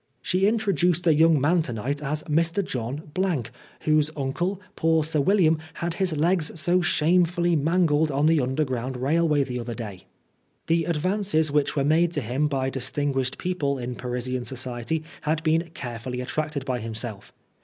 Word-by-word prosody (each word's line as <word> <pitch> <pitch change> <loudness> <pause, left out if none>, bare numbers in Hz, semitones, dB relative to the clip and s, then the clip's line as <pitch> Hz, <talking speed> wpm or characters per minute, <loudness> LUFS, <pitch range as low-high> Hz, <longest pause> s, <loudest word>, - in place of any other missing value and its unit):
" - - -45
She 190 +2 +2
introduced 180 -6 +1
a 165 - +5
young 160 0 +5
man 165 +6 +3
to 145 - -4
night 135 +7 -3
as 150 +1 -2
Mr. 165 +5 +1
John, 135 +4 -5 0.7
whose 155 -1 +2
uncle, 175 +8 -2 0.2
poor 160 -1 +2
Sir 155 -1 0
William, 165 -2 +3 0.2
had 170 0 -3
his 175 -3 0
legs 165 0 +1
so 175 +3 +2
shamefully 175 +1 +2
mangled 160 0 +2
on 140 +1 +1
the 160 -1 +4
underground 130 -1 -2
railway 150 +2 +2
the 125 -2 -4
other 120 0 -5
day." 105 -6 -8 0.6
The 165 0 +1
advances 170 -1 +1
which 150 0 +1
were 140 - +1
made 165 +3 +3
to 145 - -1
him 130 +6 0
by 135 -2 -1
distinguished 135 0 -1
people 150 -7 -1
in 125 0 -4
Parisian 125 0 -3
society 130 +4 -3 0.2
had 155 +1 -1
been 165 +1 +1
carefully 125 0 -5
attracted 145 +2 -3
by 125 -2 -1
himself. 110 -2 -5
150 Hz, 165 wpm, -25 LUFS, 130-165 Hz, 0.7 s, a